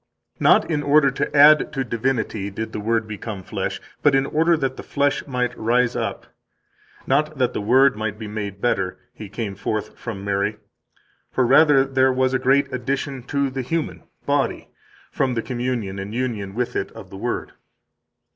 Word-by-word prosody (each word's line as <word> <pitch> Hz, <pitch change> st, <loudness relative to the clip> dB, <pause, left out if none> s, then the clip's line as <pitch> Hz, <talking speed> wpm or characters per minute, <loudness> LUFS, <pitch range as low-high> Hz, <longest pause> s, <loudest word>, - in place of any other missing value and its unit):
"Not -, -, +4 dB
in 150 Hz, -2 st, +1 dB
order 145 Hz, -1 st, +4 dB
to 135 Hz, -, -3 dB
add 150 Hz, +2 st, +7 dB
to 135 Hz, -2 st, -1 dB
divinity 115 Hz, -4 st, -2 dB
did 110 Hz, +3 st, -5 dB
the -, -, -3 dB
Word 110 Hz, +1 st, 0 dB
become 105 Hz, -2 st, -6 dB
flesh, -, -, -3 dB, 0.2 s
but 145 Hz, -2 st, +4 dB
in 135 Hz, 0 st, +3 dB
order 165 Hz, +3 st, +2 dB
that 135 Hz, -3 st, -1 dB
the -, -, -7 dB
flesh 145 Hz, 0 st, -1 dB
might 125 Hz, -2 st, -1 dB
rise 120 Hz, +2 st, +1 dB
up; -, -, -3 dB, 0.8 s
not 150 Hz, +3 st, +1 dB
that 125 Hz, -2 st, +1 dB
the -, -, -2 dB
Word 130 Hz, +4 st, +4 dB
might 105 Hz, -1 st, -3 dB
be 110 Hz, -1 st, -7 dB
made 105 Hz, -2 st, -5 dB
better, 95 Hz, -6 st, 0 dB, 0.2 s
He 105 Hz, -2 st, -9 dB
came 110 Hz, -1 st, -4 dB
forth 100 Hz, +2 st, -3 dB
from 100 Hz, -4 st, -6 dB
Mary; 100 Hz, +1 st, 0 dB, 0.7 s
for 130 Hz, -, +2 dB
rather 140 Hz, +2 st, +6 dB, 0.3 s
was 130 Hz, 0 st, +1 dB
there 130 Hz, -, +1 dB
a -, -, -15 dB
great 140 Hz, +1 st, +3 dB
addition 135 Hz, +1 st, -2 dB
to 140 Hz, -1 st, 0 dB
the 135 Hz, 0 st, -3 dB
human 125 Hz, -, -3 dB, 0.2 s
(body) -, -, 0 dB, 0.4 s
from 130 Hz, -2 st, 0 dB
the 115 Hz, -, -1 dB
communion 120 Hz, -6 st, -3 dB
and 100 Hz, +3 st, -6 dB
union 110 Hz, -6 st, -3 dB
with 125 Hz, 0 st, -2 dB
it -, -, -2 dB
of 105 Hz, -5 st, -11 dB
the 95 Hz, -, -8 dB
Word." 120 Hz, +4 st, -3 dB
125 Hz, 180 wpm, -22 LUFS, 105-135 Hz, 0.8 s, add